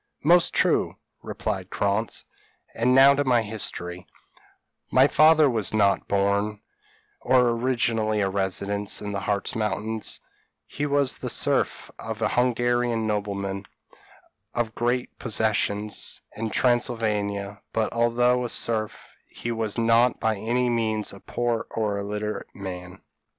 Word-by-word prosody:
p> 150 - 0
"Most 175 0 +6
true," - - +2 0.3
replied 95 -4 -4
Krantz, 100 +3 -1 0.5
"and 125 +3 +2
now 135 +1 +8
to 145 +1 +1
my 125 -4 +3
history: 90 -5 -4 0.8
"My 130 +1 +5
father 155 0 +5
was 110 -4 -1
not 100 -2 +2
born, 100 +1 0 0.6
or 125 -2 +3
originally 115 -3 0
a 100 - +2
resident, 100 +1 -1
in 105 -1 -5
the 100 - -2
Hartz 100 0 -1
Mountains; 110 0 -2 0.5
he 145 +1 -3
was 140 -2 +1
the - - -4
serf - - 0
of 110 0 -5
an 110 - +1
Hungarian 120 -1 +1
nobleman, 100 -2 -3 0.9
of 115 -2 -1
great 120 +2 -2
possessions, 105 -2 -1 0.2
in 110 0 -3
Transylvania; 105 -5 0
but, 110 -1 -1
although 120 +1 +2
a 120 - -3
serf, 110 -2 -2 0.2
he 120 - -6
was 110 -2 -3
not 115 +1 +3
by 110 -1 +1
any 120 +5 0
means 110 -3 -1
a 100 - -11
poor 120 0 -2
or 105 -2 -1
illiterate 105 +1 -4
man. 90 -1 -8
110 Hz, 130 wpm, -25 LUFS, 100-120 Hz, 0.9 s, now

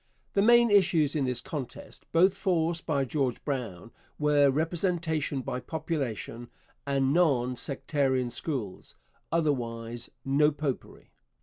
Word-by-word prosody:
The 200 - +3
main 235 +1 +6
issues 170 -7 +4
in 145 -3 +1
this 125 -1 -1
contest, 140 -6 -8
both 180 +3 +5
forced 170 -3 0
by 140 -4 +1
George 130 -2 -2
Brown, 115 -8 -4 0.3
were 145 -1 +4
'Representation 160 -1 0
by 125 - -3
Population' 125 -5 -4 0.4
and 135 -1 +1
'Non 135 -8 +2
sectarian 130 0 -1
Schools' 120 - -4 0.4
otherwise 120 -7 -2 0.2
No 140 +2 +4
Popery. 145 -3 -5
145 Hz, 115 wpm, -28 LUFS, 125-165 Hz, 0.4 s, main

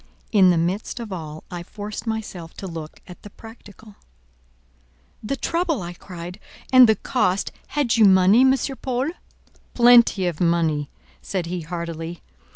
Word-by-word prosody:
In 195 -5 +5
the 175 - +3
midst 180 +8 -2
of 225 -4 -6
all 155 -3 -7
I 175 -1 -5
forced 205 +5 -8
myself 200 -7 -5
to - - -8
look 165 -4 -8
at 180 - -13
the 205 - -11
practical. 215 -1 -15 1.2
"The 225 +6 -3
trouble!" 335 - -1
I 175 0 -6
cried, 175 +1 -9 0.3
"and 255 -3 +8
the 220 - +5
cost! 195 -6 -1 0.2
Had 280 -6 0
you 220 - +6
money, 190 +4 +6
M. 265 0 +5 0.3
Paul?" 260 +4 -1 0.6
"Plenty 235 -5 +5
of 175 -2 -3
money!" 165 -4 +1 0.3
said 185 -3 -3
he 175 +1 -4
heartily. 165 0 -6
190 Hz, 150 wpm, -22 LUFS, 170-225 Hz, 1.2 s, and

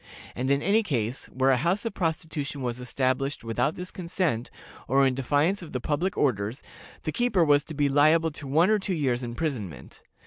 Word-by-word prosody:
And 130 +2 -2
in 140 +1 +2
any 205 +5 +4
case 125 - -2
where 130 +1 +2
a 130 - +4
house 175 - 0
of 230 - -2
prostitution 155 -5 -3
was 120 0 -2
established 130 +2 -1
without 120 +6 0
this 180 +1 -7
consent, 170 -9 -2 0.4
or 135 +2 +4
in 130 - +2
defiance 145 +9 +1
of 170 - -10
the 125 - -1
public 165 +9 -1
orders, 115 -2 0 0.4
the 155 - -2
keeper 210 -5 +2
was 145 -1 +4
to 160 - -8
be 145 0 +2
liable 155 +4 +4
to 145 -1 -8
one 165 +9 +4
or 215 - +3
two 190 -1 -2
years' 130 -6 0
imprisonment. 120 - -5
145 Hz, 195 wpm, -27 LUFS, 130-170 Hz, 0.4 s, any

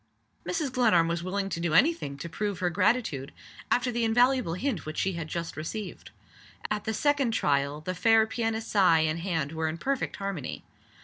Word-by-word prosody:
Mrs. 260 - -1
Glenarm 220 -10 +4
was 170 0 -1
willing 195 +2 -2
to 170 - -3
do 170 -2 0
any 310 - +6
thing 140 - -7
to 170 - -6
prove 200 +4 -3
her 180 -1 0
gratitude, 185 - +1 0.4
after 250 0 +2
the 235 0 -1
invaluable 245 -4 +3
hint 220 - -2
which 155 0 -7
she 190 - 0
had 165 -2 -5
just 170 +1 -4
received. 190 +6 -6 0.6
At 210 -1 -2
the 220 - -1
second 280 -1 +2
trial 140 +1 +1
the 185 +4 -3
fair 220 +4 +4
pianist's 225 -1 -3
eye 180 -5 +5
and 155 +1 0
hand 165 -5 -2
were 160 0 -2
in 160 - -4
perfect 275 +7 -2
harmony. 195 -8 -5
185 Hz, 190 wpm, -28 LUFS, 165-225 Hz, 0.6 s, any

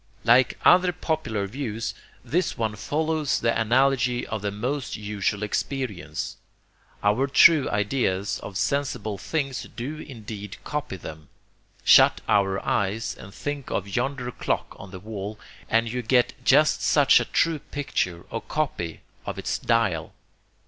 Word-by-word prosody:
Like 120 +2 +4
other 180 0 +6
popular 155 - -2
views, 115 0 -4 0.3
this 175 +2 0
one 110 -2 -1
follows 155 +5 0
the 115 0 +1
analogy 125 +1 +2
of 110 -2 -4
the 100 - -1
most 125 +7 -3
usual 105 0 -2
experience. 105 - -3 0.7
Our 105 +7 +3
true 145 +1 +6
ideas 105 -2 0
of 95 -2 -7
sensible 130 -7 -1
things 135 +2 -3
do 140 +6 -5
indeed 105 -7 -8
copy 150 -9 -4
them. 80 -3 -10 0.5
Shut - - +7
your 95 -1 +2
eyes 105 +3 0
and 100 - -11
think 145 +5 -5
of 100 0 -3
yonder 125 0 -1
clock - - -2
on 95 - -9
the 95 0 -9
wall, 105 +1 -6 0.3
and 115 +1 +3
you 125 +2 -2
get 120 +1 +2
just - - +4
such - - +5
a - - -1
true 165 -2 +1
picture 90 -13 -3
or 115 - -3
copy 110 - -3 0.3
of - - -4
its - - -2
dial. 105 -9 0
115 Hz, 140 wpm, -25 LUFS, 100-135 Hz, 0.7 s, Shut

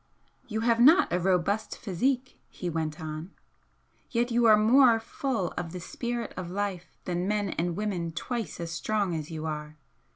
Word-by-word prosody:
"You 220 -1 -2
have 230 0 +3
not 310 +10 +6
a 180 - +2
robust 190 +4 0
physique," 250 +7 -1
he 175 -2 -5
went 155 -1 -2
on 155 +2 -6 0.8
"Yet 240 0 0
you 235 0 +3
are 215 -1 +8
more 230 +2 +6
full 225 -4 -2
of 170 -1 -4
the 180 - -5
spirit 235 +6 -4
of 180 -1 -5
life 185 -3 -4
than 180 +1 -1
men 205 -1 0
and 170 0 -1
women 185 -5 -2
twice 220 +4 -4
as 170 -1 -4
strong 200 +2 -1
as 155 -2 -4
you 160 -1 -5
are. 150 -1 -5
190 Hz, 170 wpm, -28 LUFS, 170-230 Hz, 0.8 s, are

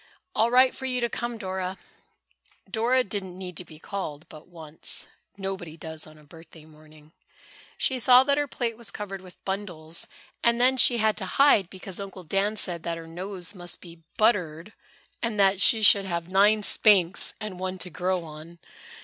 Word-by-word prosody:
"All 225 +2 +2
right 255 +1 +5
for 265 - -6
you 250 -1 0
to 235 -1 0
come, 240 0 -4
Dora." 190 -1 -4 0.9
Dora 245 +3 +2
didn't 190 -4 -5
need 180 -2 -7
to - - -4
be 155 -2 -14
called 160 -3 -6
but 155 0 -13
once. 160 -3 -3 0.3
Nobody 190 -5 -5
does 160 -1 -4
on 155 0 -15
a 150 - -18
birthday 160 +1 -15
morning. 155 0 -19 0.7
She 260 -1 +1
saw 250 +1 +7
that 280 +1 +1
her 290 - -1
plate 235 -3 -3
was 235 - -4
covered 195 -2 -6
with 185 -1 -16
bundles, 175 -5 -3 0.4
and 235 0 +3
then 255 +2 +5
she 245 -1 +5
had 220 -1 +2
to 190 - +1
hide 275 -10 +5
because 190 0 -6
Uncle 195 -2 -8
Dan 195 +5 0
said 175 -5 +1
that 170 0 -3
her 165 - -9
nose 180 +2 -5
must 175 -3 -6
be 170 -2 -13 0.2
buttered 180 -4 +1 0.5
and 225 -3 -2
that 195 -1 +4
she 220 +3 +6
should 200 -1 +6
have 170 -2 -3
nine 205 +3 +3
spanks, 195 -4 +3
and 210 -4 -6
one 185 0 -3
to 180 -1 -4
grow 180 +1 -1
on. 160 +2 -11
190 Hz, 185 wpm, -26 LUFS, 170-215 Hz, 0.9 s, saw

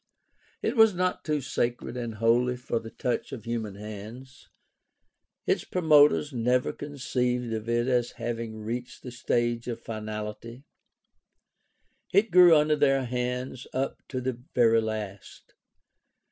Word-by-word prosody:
It - - 0
was 220 -4 +6
not 185 +1 -1
too 150 -2 -1
sacred 120 -1 -2
and 120 -3 -4
holy 120 +3 +2
for 120 -2 -2
the 115 - -9
touch 125 +2 -3
of 125 -5 -7
human 115 -4 -4
hands. 110 +6 -10 1.0
Its - - +1
promoters 150 -4 +4
never 125 +1 +1
conceived 125 -4 -2
of 110 +1 -4
it 120 0 +1
as 125 -2 +1
having 115 -1 -4
reached 120 +3 -5
the 125 - -7
stage 120 -1 -1
of 120 -2 -4
finality. 110 +2 -6 1.5
It 205 +4 +3
grew 175 -2 +8
under 150 0 +3
their 135 -2 +2
hands 125 +1 -3
up 135 +1 -2
to 130 - -3
the 130 +1 -1 0.2
very 115 -2 +5
last. 105 -3 -6
125 Hz, 130 wpm, -27 LUFS, 115-135 Hz, 1.5 s, grew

